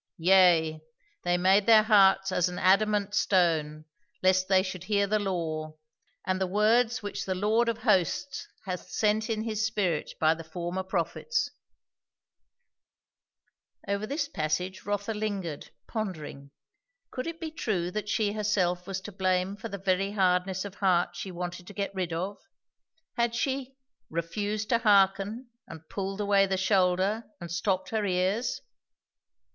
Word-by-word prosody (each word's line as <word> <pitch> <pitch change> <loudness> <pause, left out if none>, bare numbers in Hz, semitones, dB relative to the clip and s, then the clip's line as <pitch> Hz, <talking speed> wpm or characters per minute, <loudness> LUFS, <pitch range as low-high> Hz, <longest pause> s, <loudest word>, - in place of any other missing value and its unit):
Yea, 170 -3 +4 0.4
they 175 0 +1
made 190 +3 +3
their 220 -2 +7
hearts 195 -3 +5
as 180 -1 +2
an 180 - -7
adamant 205 +1 +2
stone, 160 -7 +1 0.4
lest 185 0 +3
they 190 -1 +4
should 185 -2 -6
hear 200 -1 +2
the 215 +2 +1
law, 160 -5 -3 0.5
and 185 0 -1
the 190 - +1
words 225 +5 +2
which 205 - -4
the 185 - -1
Lord 220 +5 +2
of 230 - -1
hosts 215 +5 +1 0.2
hath 180 -2 -5
sent 215 +1 +1
in 220 -1 -1
his 220 -1 -2
spirit 190 -8 -1
by 160 0 +4
the 165 0 -8
former 175 +3 -4
prophets" 190 - -2 2.4
Over 200 +2 -1
this 285 +2 -2
passage 180 - -3
Rotha 205 +2 -1
lingered, 200 -8 -4 0.2
pondering. 155 -10 -5 0.6
Could 255 - -4
it 330 0 -5
be 320 -1 -5
true 185 - -2
that 210 +1 -4
she 210 -2 +1
herself 190 -4 0
was 190 -1 -4
to 210 - -8
blame 185 0 0
for 220 +2 -7
the 200 - -5
very 195 +1 0
hardness 185 -1 +1
of 200 - -7
heart 180 -3 +1
she 190 - -5
wanted 175 0 -6
to 205 - -9
get 200 0 -3
rid 185 -3 -3
of? 185 +5 -3 0.8
Had 235 0 +1
she 265 +1 -2 0.3
"refused 205 +6 -3
to 235 - +3
hearken 205 +3 +2 0.2
and 160 0 -11
pulled 195 0 -4
away 200 -1 +3
the 190 0 0
shoulder 190 +3 +2
and 170 -1 -8
stopped 185 +1 -1
her 220 -1 0
ears"? 190 +4 0
195 Hz, 150 wpm, -28 LUFS, 180-215 Hz, 2.4 s, their